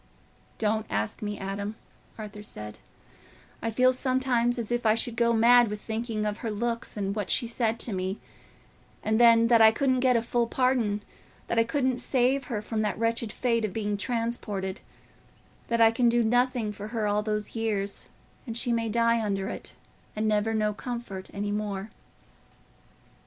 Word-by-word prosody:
"Don't 215 0 0
ask 105 +1 -2
me, 210 -1 -3
Adam," 200 +2 -4 0.4
Arthur 210 -1 -8
said; 105 - -6 0.8
"I 230 - -1
feel 255 +3 +3
sometimes 255 -2 +1
as 235 -1 -4
if 240 0 0
I 220 -1 +4
should 230 0 -1
go 235 0 +3
mad 235 +1 +6
with 210 0 -4
thinking 220 0 -3
of 210 0 -2
her 230 - -3
looks 230 +1 -3
and 200 0 -2
what 205 -3 -3
she - - +3
said 230 -1 -1
to 230 - -2
me, 190 +1 -3 0.8
and 220 +1 +1
then, 230 -1 +7
that 230 -2 +6
I 220 0 +8
couldn't 260 +2 +1
get 255 -1 +3
a 230 - +2
full 235 0 0
pardon—that 230 -2 -1
I - - +5
couldn't 255 0 0
save 260 +1 +1
her 215 -4 -4
from 220 0 -2
that 210 - -1
wretched 230 0 -1
fate 230 -1 0
of 210 -4 -2
being 210 -2 -1
transported—that 230 0 -5
I 225 -1 +7
can 235 +1 +3
do 235 0 +3
nothing 245 -1 +1
for 205 +1 -7
her 220 -1 -2
all 205 0 +1
those 210 0 -3
years; 205 -3 -1 0.4
and 230 -1 -4
she 240 0 +1
may 230 -1 0
die 230 +1 +2
under 195 -2 -1
it, - - -8 0.4
and 215 +1 0
never 215 +1 +1
know 210 -1 +1
comfort 235 -5 -6
any 205 0 -3
more." 205 0 -3
225 Hz, 175 wpm, -27 LUFS, 210-240 Hz, 0.8 s, I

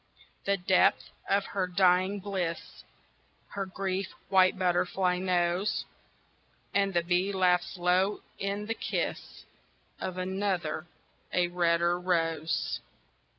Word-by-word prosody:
The 200 0 +2
depth 185 0 +3 0.2
of 200 0 +2
her 190 -2 -2
dying 185 +2 +3
bliss 185 -4 -4 0.7
Her 195 -1 -4
grief 190 0 -2 0.2
white 185 0 +5
butterfly 180 0 +1
knows: 180 +1 0 0.9
And 200 0 +2
the 170 - +3
bee 180 +3 +1
laughs 185 -1 +2
low 180 +3 +2 0.2
in 200 +1 -2
the 225 - -1
kiss - - -4 0.5
Of 185 -1 -4
another, 185 -4 -2 0.4
a 175 -1 +2
redder 175 0 +2
rose. 165 -3 0
185 Hz, 110 wpm, -29 LUFS, 175-195 Hz, 0.9 s, white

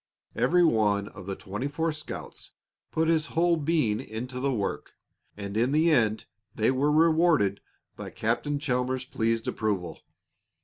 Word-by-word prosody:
Every 180 +1 +3
one 105 -8 +2
of 95 -2 -11
the 95 - -3
twenty 105 +6 -5
four 160 +3 -1
scouts 155 0 -8 0.4
put 160 0 0
his 160 -1 +2
whole 170 0 +4
being 150 -9 +1
into 125 +4 -6
the 140 +1 0
work, 105 -6 -3 0.4
and 100 0 -6
in 120 +4 +2
the 160 +2 +4
end 110 -6 +2 0.3
they 110 +3 +2
were 140 +3 +1
rewarded 155 - +3 0.3
by - - -7
Captain 120 +6 -1
Chalmers's 130 -2 -1
pleased 115 -2 -1
approval. 100 -6 -2
125 Hz, 145 wpm, -27 LUFS, 110-155 Hz, 0.4 s, whole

